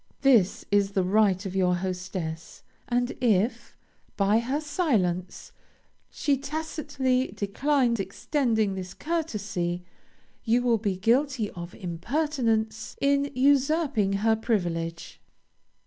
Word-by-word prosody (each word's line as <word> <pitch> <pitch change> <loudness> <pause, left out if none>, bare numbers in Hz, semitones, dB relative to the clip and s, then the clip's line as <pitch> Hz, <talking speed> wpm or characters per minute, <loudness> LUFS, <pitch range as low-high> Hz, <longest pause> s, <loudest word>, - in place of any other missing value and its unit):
This 235 -9 +3
is 200 -1 +2
the 190 - +2
right 195 0 +2
of 190 -1 -5
your 180 -2 +3
hostess, 180 -3 -5 0.3
and 245 +1 +1
if, 220 -1 +1 0.4
by 205 +2 +3
her 260 +5 -1
silence, 220 - -1 0.6
she 285 -2 0
tacitly 285 -3 -1
declines 240 +3 +1
extending 220 +1 0
this 190 0 -6
courtesy, 205 - -2 0.6
you 240 +2 +2
will 235 -2 +2
be 200 -3 -1
guilty 235 +2 +1
of 175 0 -8
impertinence 225 - -1
in 280 0 +2
usurping 275 -5 +2
her 225 0 +5
privilege. 170 -7 -2
220 Hz, 105 wpm, -26 LUFS, 190-275 Hz, 0.6 s, her